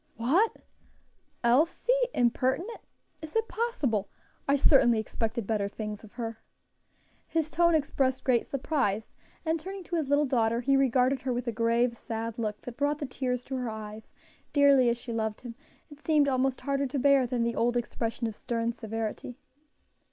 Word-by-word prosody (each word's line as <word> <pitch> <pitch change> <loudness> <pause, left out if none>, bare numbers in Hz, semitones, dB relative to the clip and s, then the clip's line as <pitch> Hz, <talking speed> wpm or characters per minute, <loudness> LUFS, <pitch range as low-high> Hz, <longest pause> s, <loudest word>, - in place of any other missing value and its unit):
"What! 325 - +2 0.8
Elsie 300 - +3 0.2
impertinent! 260 - 0 0.4
is 315 +3 -9
it 450 0 +1
possible? 280 - -1 0.4
I 280 - +4
certainly 265 -4 +5
expected 225 +1 -2
better 210 -1 0
things 210 0 -6
of 220 - -14
her." 230 -2 -5 0.9
His 320 -1 -1
tone 340 +1 +4
expressed 270 -3 0
great 245 -3 +2
surprise, 260 -7 -1 0.3
and 320 +1 +1
turning 385 +3 -7
to 345 0 -3
his 300 -4 -2
little 290 +1 +4
daughter, 235 -3 +1
he 275 +2 +3
regarded 265 0 +3
her 260 - -2
with 245 0 -2
a 235 - -1
grave, 235 +1 +1
sad 230 0 -5
look 210 -2 -2
that 245 -1 -9
brought 290 +1 +1
the 295 - -4
tears 250 -1 -3
to 265 - -4
her 250 -2 -2
eyes; 215 0 -8 0.4
dearly 280 -4 +5
as 235 - 0
she 235 0 -7
loved 220 -1 -2
him, 240 -2 -7 0.4
it 290 - -12
seemed 300 -2 +3
almost 260 -1 +1
harder 275 0 0
to 260 - -3
bear 275 -1 +4
than 240 -1 0
the 235 0 -1
old 240 +1 +1
expression 235 0 -2
of 220 -2 -3
stern 230 +1 -2
severity. 225 +1 -5
250 Hz, 170 wpm, -28 LUFS, 230-280 Hz, 0.9 s, certainly